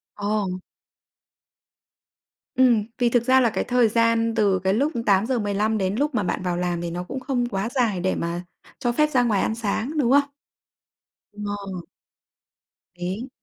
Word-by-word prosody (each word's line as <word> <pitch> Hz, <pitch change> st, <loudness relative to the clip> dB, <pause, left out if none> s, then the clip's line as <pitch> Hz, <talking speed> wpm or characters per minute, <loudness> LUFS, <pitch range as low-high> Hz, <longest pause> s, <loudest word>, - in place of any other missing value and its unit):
Ồ. 205 Hz, -3 st, -2 dB, 1.9 s
Ừm, 245 Hz, -5 st, +4 dB
vì 245 Hz, -1 st, +2 dB
thực 235 Hz, 0 st, +2 dB
ra 260 Hz, +1 st, +5 dB
là 235 Hz, -, +3 dB
cái -, -, -2 dB
thời 245 Hz, -2 st, +3 dB
gian 230 Hz, 0 st, +2 dB
từ 200 Hz, -4 st, +2 dB
cái 190 Hz, +1 st, +1 dB
lúc 285 Hz, +8 st, +1 dB
8:15 210 Hz, 0 st, +1 dB
đến 190 Hz, -1 st, -1 dB
lúc 290 Hz, +3 st, 0 dB
mà 210 Hz, -, +1 dB
bạn 180 Hz, +1 st, -2 dB
vào 175 Hz, -1 st, -1 dB
làm 175 Hz, -1 st, -1 dB
thì 170 Hz, -1 st, -4 dB
nó 175 Hz, +1 st, -4 dB
cũng 265 Hz, +9 st, -6 dB
không 255 Hz, -2 st, -1 dB
quá 195 Hz, +2 st, -2 dB
dài 235 Hz, -8 st, 0 dB
để 185 Hz, +1 st, 0 dB
mà 170 Hz, +1 st, -3 dB, 0.4 s
cho 240 Hz, -3 st, 0 dB
phép 300 Hz, +5 st, +2 dB
ra 250 Hz, -4 st, +2 dB
ngoài 210 Hz, -5 st, +1 dB
ăn 220 Hz, -, 0 dB
sáng, 230 Hz, +7 st, -2 dB
đúng 255 Hz, -3 st, +2 dB
không? 285 Hz, 0 st, +4 dB, 1.0 s
Ờ. 205 Hz, -3 st, -5 dB, 1.2 s
Đấy. 190 Hz, +9 st, -4 dB
220 Hz, 165 wpm, -23 LUFS, 190-245 Hz, 1.9 s, ra